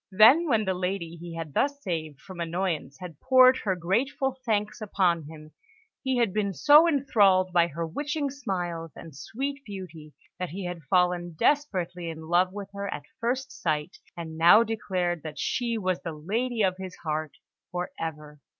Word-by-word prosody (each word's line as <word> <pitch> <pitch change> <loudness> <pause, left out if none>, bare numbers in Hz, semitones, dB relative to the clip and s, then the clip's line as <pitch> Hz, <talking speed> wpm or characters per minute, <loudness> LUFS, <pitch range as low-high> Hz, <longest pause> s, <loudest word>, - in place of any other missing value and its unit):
Then, 230 - +6
when 225 -6 +2
the 190 - +1
lady 180 -2 -3
he 170 0 -8
had 165 -3 -6
thus 280 - +1
saved 160 - -4
from 185 -3 -11
annoyance 170 -5 -2
had 170 -5 -9
poured 260 0 +6
her 190 -3 -1
grateful 250 +9 0
thanks 215 -2 -1
upon 180 -6 +1
him, 155 -1 -12 0.5
he 265 -2 0
had 230 -6 +1
been 200 -2 0
so 295 - +7
enthralled 205 - +3
by 170 -1 +4
her 165 +1 -4
witching 290 - -3
smiles 175 - -4
and 160 -4 -11
sweet 275 - -5
beauty, 180 - -9 0.3
that 180 -1 -3
he 185 +3 -6
had 175 -1 -5
fallen 180 -2 +1
desperately 180 - 0
in 160 -1 -7
love 180 +2 +3
with 200 0 -8
her 200 0 -4
at 145 - -5 0.2
first 250 +3 -1
sight, 155 0 -3 0.2
and 160 -1 -7
now 175 +7 +8
declared 185 -6 -2
that 155 -1 -8
she 235 -2 -1
was 185 -4 -1
the 165 - -5
lady 220 +9 -1
of 185 -1 +1
his 185 -1 -7
heart 155 -1 -2 0.4
for 180 0 -3
ever. 150 -2 -6
185 Hz, 175 wpm, -27 LUFS, 165-225 Hz, 0.5 s, now